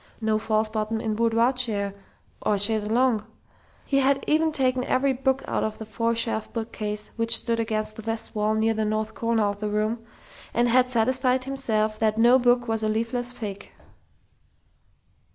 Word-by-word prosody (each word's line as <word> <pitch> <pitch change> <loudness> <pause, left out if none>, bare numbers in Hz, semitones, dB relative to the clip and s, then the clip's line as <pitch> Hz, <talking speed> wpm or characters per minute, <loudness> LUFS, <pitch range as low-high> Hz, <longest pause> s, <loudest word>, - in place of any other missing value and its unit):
No 220 -1 +1
false 215 0 +1
bottom 215 0 -2
in 220 -1 -2
boudoir 230 +3 +2
chair 210 -6 -1 0.5
or 210 - +1
chaise 210 +1 +2
longue.... 235 -2 +2 0.6
He 275 - 0
had 275 0 +2
even 315 +1 +2
taken 255 -3 +1
every 270 +1 +1
book 265 +1 0
out - - -1
of 215 0 -3
the 220 - -7
four 230 +2 -1
shelf 225 -1 -1
bookcase 210 -2 -4
which 230 0 +3
stood 230 0 -1
against 215 -1 -2
the - - -6
west 225 0 -4
wall 215 0 0
near 220 +1 +2
the 220 0 -1
north 215 0 -2
corner 230 -1 0
of 205 0 -1
the 210 0 -2
room, 215 +2 -1 0.5
and 240 +1 +3
had 250 +1 +3
satisfied 255 +2 +1
himself 220 -5 0
that 220 -1 +1
no 240 +3 +6
book 245 0 +2
was 225 -1 0
a 215 - 0
leafless 230 +3 -1
fake. 205 -5 -7
225 Hz, 175 wpm, -25 LUFS, 215-250 Hz, 0.6 s, no